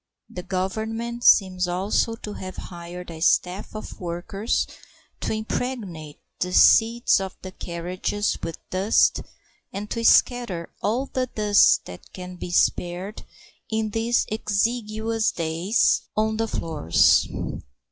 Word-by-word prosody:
The 180 - -6
Government 220 +6 -3
seems 185 -4 +5
also 195 +5 0
to 210 -2 -8
have 185 -2 -7
hired 175 0 -8
a 160 - -8
staff 185 +4 +1
of 215 - -8
workers 180 +5 -2 0.5
to - - -3
impregnate 215 - -4 0.2
the 180 0 -2
seats 230 +4 +5
of 190 -1 -5
the 185 - -7
carriages 180 +4 -3
with 165 -1 -5
dust 195 +4 +3 0.5
and 205 +2 -6
to 230 - -2
scatter 230 -9 +3
all 235 +6 0
the 255 -1 -2
dust 210 -3 +4
that 90 - -11
can 180 -1 -8
be 180 - -7
spared 180 +3 0 0.5
in 220 -1 -1
these 230 +2 +1
exiguous 220 0 0
days 170 +6 +1 0.2
on 220 0 +1
the 225 0 0
floors. 155 - +3
200 Hz, 125 wpm, -24 LUFS, 180-225 Hz, 0.5 s, seems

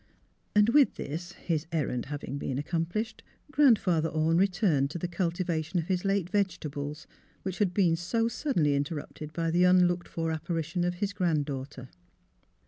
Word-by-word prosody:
'* - - -42
And, 210 +1 +5
with 280 +2 +5
this, 170 +5 -5
his 160 -2 -2
errand 140 -6 -1
having 145 0 -5
been 130 - -3
accom 165 +3 -1
plished, 220 +5 -3 0.3
Grandfather 200 - +4
Orne 160 +2 +2
returned 180 -8 +2
to 160 - -5
the 175 - -2
culti 175 0 -1
vation 160 0 -2
of 170 0 0
his 180 -1 0
late 195 -3 +1
vegetables, 155 -7 -2 0.4
which 190 -1 -4
had 200 -4 +2
been 175 -3 +3
so 225 +7 0
suddenly 230 - +1
interrupted 145 +1 -4
by 165 +1 -1
the 175 +2 +3
unlooked 180 -1 +4
for 165 -1 -2
appari 165 +1 -2
tion 175 +3 -2
of 175 0 -1
his 200 +2 -2
grand 165 -6 +1
daughter. 135 -2 -6
170 Hz, 175 wpm, -29 LUFS, 155-185 Hz, 0.4 s, And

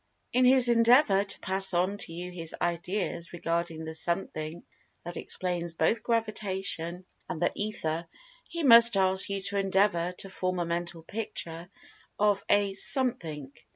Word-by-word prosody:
In 255 +1 +3
his 255 -1 +6
endeavor 230 -3 +4
to 195 - -3
pass 190 0 0
on 185 +4 0
to 165 - -2
you 175 +2 -6
his 165 -3 -5
ideas 175 0 -3
regarding 165 -1 -3
the 160 - -6
Something 160 -1 -3 0.4
that 175 0 -7
explains 175 -2 -1
both 195 +9 0
Gravitation 195 -6 -2 0.2
and 180 -4 -5
the 175 - +1
Ether, 170 -6 -3 0.4
he 335 -1 -5
must 235 -4 +7
ask 190 0 +5
you 200 0 -3
to 200 +1 -2
endeavor 190 -2 +1
to 190 - -5
form 185 -1 -3
a 175 - -1
Mental 170 0 -4
Picture 170 -4 -4 0.5
of 205 -1 +1
a 205 -1 +2
"Something." 180 - -1
185 Hz, 150 wpm, -28 LUFS, 170-205 Hz, 0.5 s, must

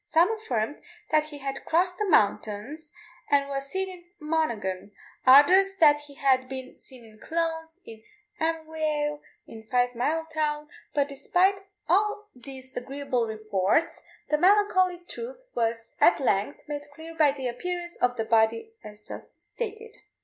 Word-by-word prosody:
Some 340 +6 +3
affirmed 260 - -3 0.3
that 310 0 +3
he 300 -1 -10
had 275 -1 -5
crossed 360 +2 +1
the 420 -2 0
mountains, 225 - 0 0.4
and 280 -1 +3
was 275 0 -4
seen 380 +6 -2
in 360 -2 -11
Monaghan; 230 - -2 0.3
others, 370 +9 +7
that 300 -5 +5
he 285 - -14
had 260 -2 +2
been 260 -1 -8
seen 250 -3 -12
in 215 -1 -17
Clones, 325 +2 -3
in 220 -1 -11 0.4
Emyvale, 315 -2 -1 0.2
in 220 -1 -12
Five 245 0 +2
mile 310 +7 -1
town; 300 -1 -2 0.3
but 285 -1 +2
despite 360 +8 +2
of 390 - -16 0.2
all 420 +4 +1
these 260 +1 -11
agreeable 265 -2 -2
reports, 215 - 0 0.3
the 300 - +2
melancholy 370 -1 +4
truth - - -8
was 230 -1 -2
at 345 - +6
length 245 +2 -1
made 290 0 -6
clear 325 +2 -10
by 305 -3 +4
the 270 -2 -4
appearance 345 +8 -4
of 250 0 +1
the 225 - -1
body 225 - +2
as 210 0 -11
just - - -11
stated. 445 -1 -7
295 Hz, 150 wpm, -27 LUFS, 245-335 Hz, 0.4 s, others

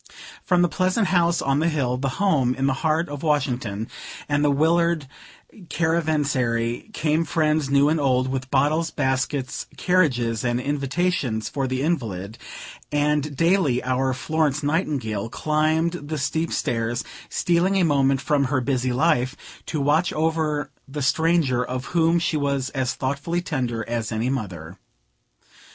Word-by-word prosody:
From 180 -1 +3
the - - +4
pleasant 185 +4 0
house 175 -2 +2
on 135 +1 +1
the 165 +2 +2
hill, 135 -6 0
the 135 +2 -1
home 145 -11 +2
in 135 +1 -1
the 135 - +2
heart 160 +2 +1
of 145 -1 -6
Washington, 125 -8 -1 0.4
and 145 0 +1
the 145 - +4
Willard 165 +2 +2 0.6
caravansary, 145 - 0
came 155 -4 +1
friends 155 -2 +1
new 140 +1 +4
and 155 +1 +2
old, 130 -2 +2
with 130 0 -3
bottles, 150 +5 +2
baskets, 130 -1 -2
carriages 125 - +1
and 120 0 0
invitations 140 -3 -1
for 135 -2 -2
the 130 +1 -2
invalid; 110 - -2 0.5
and 150 0 0
daily 165 -7 +2
our 130 +1 0
Florence 150 +2 0
Nightingale 140 - -1
climbed 155 +4 +1
the 155 -2 -5
steep 160 +3 -1
stairs, 120 0 -1 0.3
stealing 175 +3 +1
a 190 - +3
moment 135 -3 +2
from 140 0 +1
her 135 0 +1
busy 130 -1 0
life, 130 -1 +1 0.3
to 155 - -2
watch 150 +5 +2
over 155 -2 -1 0.2
the 145 +1 -4
stranger, 145 -3 +2
of 125 +1 -4
whom 165 0 +3
she 165 -2 0
was 140 -2 -1
as 130 -3 -1
thoughtfully 140 +6 -2
tender 125 -10 -3
as 115 -2 -2
any 115 +3 -1
mother. 95 -8 -5
145 Hz, 145 wpm, -23 LUFS, 130-160 Hz, 0.6 s, the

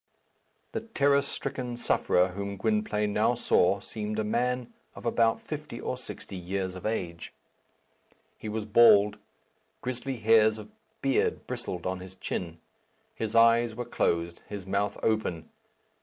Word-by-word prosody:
The - - -2
terror 140 -11 +2
stricken 125 -3 -4
sufferer 90 -5 +2
whom 100 +2 -5
Gwynplaine 105 - 0
now 110 +4 +3
saw 100 -4 +3
seemed 105 0 -5
a 110 - +1
man 120 +2 -1 0.2
of - - -10
about 115 -1 +3
fifty 150 -5 -6
or - - -2
sixty 125 -5 -9
years 95 +1 -3
of 90 +2 -5
age. 85 -6 -3 1.0
He 110 - -7
was 110 0 -3
bald. 105 -2 +6 0.6
Grizzly 130 +1 -3
hairs 110 -1 +5
of 110 - -10 0.3
beard 135 -1 +1
bristled 90 -2 -5
on 95 0 -2
his 95 0 -11
chin. 85 -3 -4 0.6
His 110 0 -4
eyes 115 0 +5
were 120 +1 -4
closed, 85 -7 -1
his 100 -3 -6
mouth 100 +1 -1
open. 100 -7 -1
110 Hz, 140 wpm, -28 LUFS, 95-120 Hz, 1.0 s, bald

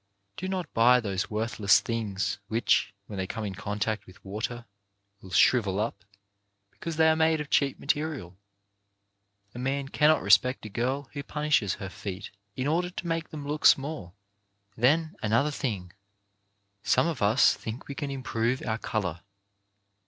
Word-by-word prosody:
Do 185 - -4
not 185 -4 -3
buy 125 +2 +6
those 100 -5 -2
worthless 105 -2 +3
things, 100 -3 -2
which, 110 -2 +2
when 100 - -8
they 95 0 -2
come 110 +2 -4
in 100 - -4
contact 105 +2 -3
with 95 +3 -17
water, 115 +4 -4 0.6
will 95 - -12
shrivel 100 -1 +3
up 105 -2 -3 0.7
because 165 -1 -6
they 160 0 +4
are 160 - +5
made 160 0 +3
of 150 -1 -6
cheap 140 -2 +2
material. 145 - -2 1.2
A 120 - -8
man 135 +2 -2
cannot 150 +2 +3
respect 110 +6 +4
a - - -6
girl 130 +6 -2
who 140 - -4
punishes 150 -8 0
her 95 - -6
feet 95 +1 -7 0.2
in 130 - -2
order 170 +4 +1
to 180 - -7
make 165 -1 -2
them 145 -2 -7
look 150 +1 -3
small. 135 - +3 0.6
Then, 155 +7 +2
another 115 +8 +2
thing. 100 -11 -4 0.9
Some - - +3
of 165 -5 -2
us 105 +5 +5
think 115 +3 -7
we 140 - -5
can 145 0 -4
improve 125 -2 -1
our 110 -1 -1
colour. 85 -8 -3
120 Hz, 160 wpm, -28 LUFS, 105-145 Hz, 1.2 s, buy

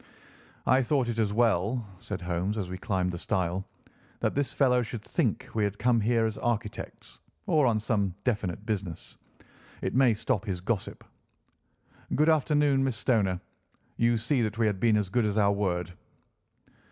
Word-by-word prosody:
"I 130 +1 +4
thought 130 -1 +1
it 115 -1 -2
as 105 -2 +1
well," 115 +1 +1
said 100 -2 -5
Holmes 90 +4 -2
as 95 -4 -3
we 95 - -4
climbed 95 -3 0
the 85 - -5
stile, 95 -1 -1 0.5
"that - - 0
this 140 -1 0
fellow 125 -3 +3
should 115 -2 -5
think - - -1
we 110 - +1
had 100 0 -1
come 120 -1 +2
here 115 +1 +2
as 110 -1 -3
architects, 110 -3 -4 0.3
or 150 -4 +3
on 110 -2 +2
some 100 -4 0
definite 105 -5 -2
business. 100 -7 -4 0.6
It - - -3
may 125 -3 +4
stop 105 -1 -1
his 95 -4 -2
gossip. 95 +2 -3 1.1
Good 155 +3 +4
afternoon, 145 -3 +3
Miss 130 -3 0
Stoner. 100 -7 +1 0.5
You 115 0 +2
see 125 +4 0
that 110 0 -1
we 115 - +2
have 105 -3 0
been 110 -1 +4
as 105 -3 -1
good 120 +2 +2
as 105 0 0
our 100 -1 +4
word." 90 -3 -1
110 Hz, 170 wpm, -28 LUFS, 95-120 Hz, 1.1 s, I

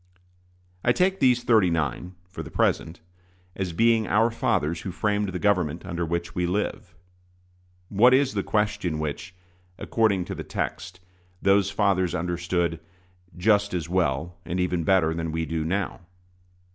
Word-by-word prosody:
I 120 - +4
take 190 +5 +1
these 125 -2 +3
"thirty 110 -6 +4
nine," 85 +3 -2
for 90 - -8
the - - -8
present, 80 +1 0 0.5
as 95 -2 -3
being 115 +4 +3
"our 115 +2 +3
fathers 85 -7 0
who 95 - -5
framed 105 +2 0
the 90 - -4
government 90 -4 0
under 85 -1 -3
which 85 +1 -3
we 90 0 -1
live." 95 -1 -3 0.9
What 110 +6 +5
is 135 +1 +3
the 100 - 0
question 105 -6 -1
which, 80 +4 -5 0.4
according 100 -6 +1
to - - -5
the - - -6
text, 90 0 -5 0.4
those 100 0 +3
fathers 95 -3 +1
understood 85 0 -1 0.6
"just 100 +1 +2
as 85 -3 -3
well, 85 -1 -1
and 90 +2 -3
even 90 -2 0
better, 80 -2 +3
than 80 -1 -3
we 80 +1 -2
do 80 0 -2
now"? 95 +5 -2
90 Hz, 150 wpm, -25 LUFS, 85-105 Hz, 0.9 s, What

